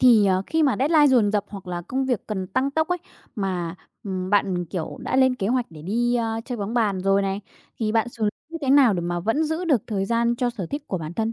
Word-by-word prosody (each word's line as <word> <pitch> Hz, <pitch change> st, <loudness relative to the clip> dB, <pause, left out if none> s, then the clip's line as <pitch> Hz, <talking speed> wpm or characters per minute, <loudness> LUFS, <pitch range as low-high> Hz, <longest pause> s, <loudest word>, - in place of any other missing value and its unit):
thì, 230 Hz, -5 st, +6 dB
ờ, 185 Hz, 0 st, +2 dB
khi 320 Hz, 0 st, +1 dB
mà 275 Hz, -4 st, +3 dB
deadline 295 Hz, +2 st, +5 dB
dồn 240 Hz, -6 st, +4 dB
dập 205 Hz, -2 st, +1 dB
hoặc 200 Hz, -3 st, -9 dB
là 175 Hz, -1 st, -4 dB
công 265 Hz, +8 st, -2 dB
việc 250 Hz, -5 st, -1 dB
cần 190 Hz, -4 st, -3 dB
tăng 260 Hz, +9 st, 0 dB
tốc 315 Hz, +2 st, 0 dB
ấy, 360 Hz, 0 st, 0 dB, 0.4 s
mà, 180 Hz, -5 st, -2 dB, 0.3 s
ừm, 185 Hz, -1 st, -3 dB
bạn, 190 Hz, -3 st, +2 dB
kiểu, 170 Hz, -1 st, -5 dB
đã -, -, -1 dB
lên 260 Hz, -1 st, +4 dB
kế 195 Hz, -, -3 dB
hoạch 245 Hz, +2 st, +1 dB
để 155 Hz, -2 st, -11 dB
đi, 240 Hz, +7 st, 0 dB
a, 225 Hz, -1 st, -1 dB
chơi 245 Hz, -2 st, -5 dB
bóng 205 Hz, +3 st, -3 dB
bàn 210 Hz, -6 st, +1 dB
rồi 195 Hz, +1 st, +2 dB
này, 195 Hz, +1 st, -2 dB, 0.4 s
thì 215 Hz, -2 st, 0 dB
bạn 225 Hz, +1 st, +2 dB
xử 220 Hz, -3 st, -1 dB, 0.2 s
như 330 Hz, -, -6 dB
thế 265 Hz, -, +1 dB
nào 270 Hz, -6 st, +6 dB
để 175 Hz, -, -1 dB
mà 175 Hz, 0 st, -2 dB
vẫn 225 Hz, -, +1 dB
giữ 320 Hz, +3 st, -2 dB
được 280 Hz, -, +2 dB
thời 195 Hz, -3 st, -1 dB
gian 235 Hz, +2 st, +1 dB
cho 245 Hz, 0 st, 0 dB
sở 210 Hz, -7 st, -5 dB
thích 285 Hz, -, -4 dB
của 185 Hz, -, -2 dB
bản 160 Hz, +1 st, -6 dB
thân. 225 Hz, +2 st, -1 dB
220 Hz, 265 wpm, -24 LUFS, 190-255 Hz, 0.4 s, thì